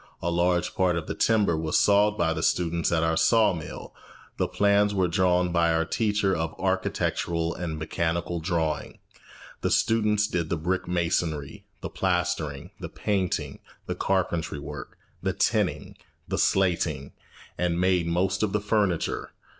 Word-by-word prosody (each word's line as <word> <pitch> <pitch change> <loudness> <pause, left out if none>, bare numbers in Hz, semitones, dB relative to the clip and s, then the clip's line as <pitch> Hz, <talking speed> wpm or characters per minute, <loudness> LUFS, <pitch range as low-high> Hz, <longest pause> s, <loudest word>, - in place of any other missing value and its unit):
A 85 - -2
large 90 0 +1
part 90 -2 +2
of 85 -2 -3
the - - -3
timber 105 -7 +2
was 80 -1 +1
sawed 105 +1 +4
by 80 - +1
the 80 - -3
students 85 0 +1
at 80 -1 +2
our 80 0 +1
saw 110 +4 +4
mill, 80 -3 -8 0.4
the - - +1
plans 100 0 +2
were 95 -2 +2
drawn 90 0 +2
by 85 -1 +3
our 80 0 +1
teacher 105 +1 +1
of 80 0 -4
architectural 85 -3 -1
and 80 -3 -4
mechanical 85 +2 -2
drawing, 80 -3 -2 0.6
and - - 0
students 105 -2 +2
did 85 -5 -2
the 85 - 0
brick 90 +3 -2
masonry, 85 -4 -2
the - - -4
plastering, 90 -6 -1
the - - -6
painting, 90 -8 -2 0.3
the - - -2
carpentry 85 -5 -1
work, 70 - -8 0.2
the - - -1
tinning, - - 0 0.3
the - - -2
slating, 85 -7 +1 0.4
and 85 -1 0
made 90 -2 +2
most 90 +3 0
of 105 -3 0
the 105 - +2
furniture. 100 -5 0
85 Hz, 155 wpm, -26 LUFS, 80-95 Hz, 0.6 s, sawed